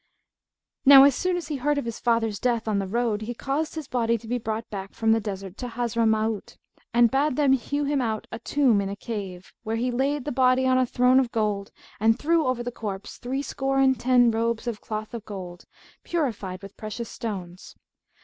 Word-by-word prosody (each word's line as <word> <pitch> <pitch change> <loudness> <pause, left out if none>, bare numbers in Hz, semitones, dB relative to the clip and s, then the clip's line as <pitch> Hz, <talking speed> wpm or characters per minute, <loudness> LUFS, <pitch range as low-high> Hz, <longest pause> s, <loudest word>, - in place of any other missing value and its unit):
Now 270 -1 +10
as 280 0 +6
soon 365 +6 0
as 330 -3 -6
he 295 - -2
heard 290 +3 0
of 285 - -2
his 230 -1 -5
father's 225 -4 +1
death 235 -3 0
on 210 -2 +1
the 195 - -2
road, 225 0 0
he 235 +2 -5
caused 290 +6 -2
his 310 -4 -5
body 235 -2 +1
to 225 +1 -13
be 245 +2 -1
brought 220 0 -4
back 195 -2 -6
from 225 -1 +2
the 225 - +4
desert 195 -3 -6
to 250 - -5
Hazramaut 225 -2 -1 0.3
and 235 -1 +4
bade 275 +1 +1
them 280 -2 +4
hew 285 +3 -1
him 285 -1 0
out 220 -3 -2
a 230 - -5
tomb 245 -4 +2
in 195 - -3
a 200 - -4
cave, 200 -5 -7
where 225 -1 -3
he 245 +2 0
laid 270 +3 0
the 295 - -2
body 255 0 +3
on 255 0 +3
a 255 - +2
throne 250 +2 +4
of 250 -3 0
gold 210 -3 -1 0.3
and 225 +2 +3
threw 320 -1 +2
over 250 -1 0
the 245 - -4
corpse 205 -4 -6
threescore 270 +1 -2
and 265 -1 +3
ten 245 -2 +4
robes 230 +1 -1
of 235 -3 -4
cloth 215 0 -5
of 230 -3 -5
gold, 180 -4 -8 0.4
purfled 210 - -3
with 195 0 -10
precious 220 +2 -5
stones. 185 -6 -7
235 Hz, 210 wpm, -25 LUFS, 215-265 Hz, 0.4 s, Now